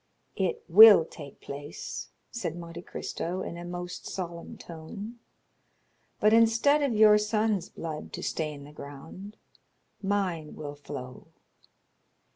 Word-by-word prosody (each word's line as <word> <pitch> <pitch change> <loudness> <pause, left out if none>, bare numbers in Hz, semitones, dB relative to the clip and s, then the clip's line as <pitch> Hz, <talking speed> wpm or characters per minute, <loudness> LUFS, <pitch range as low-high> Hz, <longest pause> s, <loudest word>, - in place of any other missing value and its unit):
"It 190 -3 -1
will 200 -1 +10
take 145 -4 -11
place," 145 +1 -7 0.2
said 230 -9 -3
Monte 170 0 -8
Cristo, 180 +1 -4
in - - -5
a 175 - -7
most 175 0 -6
solemn 170 -2 -6
tone; 200 +8 -9 1.0
"but 215 +1 +4
instead 230 +6 +5
of 275 -5 +1
your 210 0 +7
son's 210 -3 0
blood 155 -2 -6
to - - -5
stain 150 -3 -3
the 145 - -12
ground, 160 +9 -10 0.6
mine 190 -6 -1
will 145 -2 -6
flow." 140 -3 -9
175 Hz, 120 wpm, -28 LUFS, 155-210 Hz, 1.0 s, will